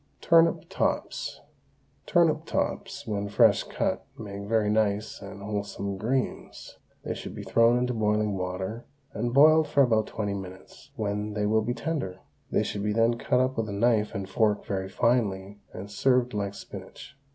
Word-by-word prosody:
TURNIP 165 0 +4
TOPS. - - -2 0.7
Turnip - - +3
tops, - - -3
when 100 -1 -2
fresh 105 0 +5
cut, - - -2
make 100 -2 -7
very 110 -1 +2
nice 105 -1 0
and 100 0 -9
wholesome 100 -1 -3
greens. 125 +5 -3 0.2
They - - -3
should - - -8
be - - -6
thrown 115 +1 +4
into 125 0 0
boiling 105 -2 +1
water 95 +5 -4 0.3
and 120 +3 -2
boiled 155 +4 +6
for 140 - +4
about 110 -4 +2
twenty 105 -2 -3
minutes, 95 -1 -9
when 105 0 -2
they 105 0 -1
will 110 +1 +3
be 120 +3 -2
tender. 140 - -3 0.3
They - - +1
should 100 - -4
then 115 +1 +4
be 120 - -3
cut 125 - +2
up 130 0 0
with 110 -2 -1
a - - -4
knife 110 0 +2
and 100 -1 -3
fork 105 +1 +1
very 95 -1 -3
finely 100 -2 0
and 100 +2 -8
served 125 +3 +2
like 100 -1 -2
spinach. 140 - -10
105 Hz, 165 wpm, -27 LUFS, 100-120 Hz, 0.7 s, boiled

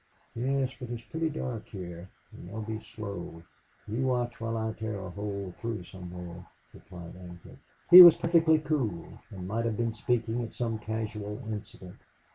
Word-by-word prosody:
"Yes. 130 +2 0
But 125 - -7
it's 120 -1 -5
pretty 160 +3 -2
dark 125 -7 -5
here. 90 -2 -8 0.2
And 85 - -11
they'll 110 +2 -5
be 110 0 -4
slow. 100 -6 -7 0.4
You 125 +5 -1
watch 120 -2 -1
while 115 0 -2
I 110 0 -1
tear 110 -1 -4
a 95 -2 -7
hole 100 -1 -5
through 110 -3 -4
somewhere," 90 -1 -9 0.3
replied 85 -2 -11
Ancliffe. 90 -1 -12 0.3
He 180 +1 +14
was 175 -2 +11
perfectly 165 -1 +4
cool 140 - -2
and 90 -2 -7
might 115 +4 -1
have 110 -2 -1
been 115 -1 0
speaking 115 +1 0
of 115 - -6
some 115 -2 -2
casual 105 +1 -4
incident. 100 -3 -8
110 Hz, 165 wpm, -29 LUFS, 95-120 Hz, 0.4 s, He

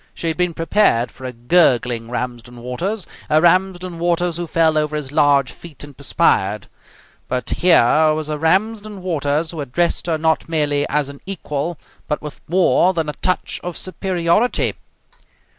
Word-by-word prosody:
She 165 - -2
had 160 - -3
been 180 -2 0
prepared 165 - +2
for 130 - -11
a 130 - -4
gurgling 120 -3 +2
Ramsden 120 0 -5
Waters, 185 - -3 0.2
a 155 - +4
Ramsden 180 0 +1
Waters 175 0 0
who 175 -1 -4
fell 160 0 +2
over 150 0 0
his 145 -3 -4
large 140 -2 +3
feet 160 -5 -11
and 145 -1 -11
perspired; 110 -8 +1 0.6
but 125 0 -3
here 160 -3 +4
was 155 -1 -3
a 150 -1 -3
Ramsden 205 +4 0
Waters 155 -2 -1
who 165 -3 -5
addressed 170 +7 -1
her 165 -2 +1
not 160 +1 0
merely 145 -3 +1
as 145 -1 0
an 140 0 -11
equal, 165 -3 -3 0.3
but 150 - -1
with 150 -1 -9
more 185 +1 +3
than 160 -2 -1
a - - -3
touch 185 -1 -1
of 175 -1 -5
superiority. 185 +4 0
160 Hz, 160 wpm, -19 LUFS, 140-175 Hz, 0.6 s, a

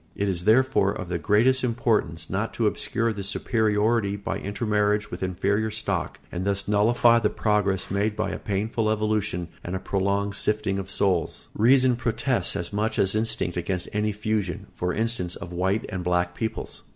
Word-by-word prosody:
It 100 - -1
is 90 -3 -1
therefore 110 -3 +4
of 90 -3 -6
the 85 -1 -1
greatest 120 - +3
importance 115 -9 0
not 100 +4 -2
to 115 - 0
obscure 115 +2 0
this 100 -1 -3
superiority 110 -2 +1
by 100 - -4
intermarriage 105 0 0
with 90 - -6
inferior 100 +4 0
stock, - - -2
and 90 +1 -3
thus 100 0 -1
nullify 115 +3 +4
the 105 -2 +1
progress 100 -4 0
made 105 +2 0
by - - -1
a - - -4
painful 110 +2 -1
evolution 105 -5 -1
and 90 - -4
a - - -2
prolonged 100 +1 -1
sifting 105 -1 0
of 95 0 -6
souls. 95 -4 0
Reason 125 +3 +4
protests 120 -2 -1
as 85 +1 -4
much 105 +2 -1
as 95 -1 +2
instinct 110 -5 +1
against 90 +1 -2
any 105 +1 0
fusion, 105 -3 -2
for 90 0 -2
instance, 110 -5 -1
of 85 +1 -8
white 95 +4 0
and 95 -3 -4
black 90 0 +1
peoples. 110 +2 -4
105 Hz, 175 wpm, -25 LUFS, 95-110 Hz, -, therefore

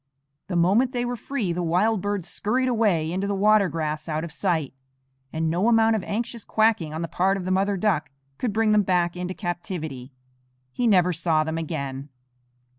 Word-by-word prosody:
The 185 - -3
moment 205 +10 +3
they 245 -1 -1
were 245 0 -2
free 230 -7 -3
the 180 - -2
wild 185 +5 +1
birds 205 -3 -2
scurried 255 +5 0
away 205 -10 +1
into 190 +3 -2
the 200 - -1
water 205 -1 +4
grass 155 0 -3
out 155 0 -1
of 170 - -6
sight, 160 -5 -1 0.6
and 160 0 -1
no 175 +7 +1
amount 225 -1 +4
of 215 - -1
anxious 235 +1 -3
quacking 215 -8 +1
on 160 +2 -4
the - - -2
part 190 +4 +1
of 185 - -5
the 185 - -1
mother 195 +1 +1
duck 180 -6 0 0.3
could 240 - -1
bring 220 +1 +2
them 210 0 +5
back 175 -2 +1
into 180 +1 -4
captivity. 170 - -5 0.6
He 240 - 0
never 180 -4 +4
saw 160 -1 +1
them 160 +1 -3
again. 140 -3 -5
185 Hz, 190 wpm, -24 LUFS, 165-215 Hz, 0.6 s, them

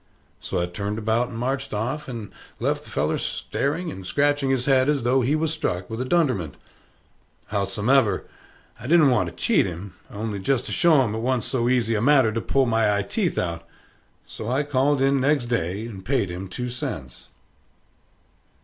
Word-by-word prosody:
So - - -3
I 85 - +1
turned 100 +4 -4
about 110 +2 +1
and 115 -2 -8
marched 135 +1 -2
off, 130 +8 -3
and 115 -5 -6 0.3
left - - -1
the - - -13
feller - - 0
staring 165 +5 -2
and 95 - -8
scratching 145 +6 +1
his 130 -2 +1
head, 135 0 +3
as 145 -4 +1
though 130 +2 +3
he 135 +5 +1
was 160 0 0
struck 105 - -3
with 110 +2 -3
a - - -2
dunderment. 130 - +1 1.0
Howsomever, 105 +6 +2 0.5
I - - -7
didn't 155 -4 +5
want 95 -8 +2
to - - -15
cheat - - +2
him, 90 +3 -7 0.2
only 105 0 -4
jest 125 +6 0
to - - -6
show 160 -6 +4
'em 110 -4 -2
it 110 - -2
wa'n't 125 0 0
so 120 0 0
easy 120 -3 +2
a 105 - 0
matter 130 -3 +5
to 115 +1 -2
pull 135 +3 +2
my 110 -3 +2
eye 100 - 0
teeth 180 - -1
out; 85 -1 -2 0.6
so 110 - -7
I 130 +4 +1
called 140 0 +1
in 135 0 +3
next 140 -2 +2
day 105 -3 -2
and 100 -5 -8
paid 115 -4 0
him 90 +2 -6
two 125 +7 -5
cents. 70 - -6
120 Hz, 190 wpm, -24 LUFS, 105-135 Hz, 1.0 s, didn't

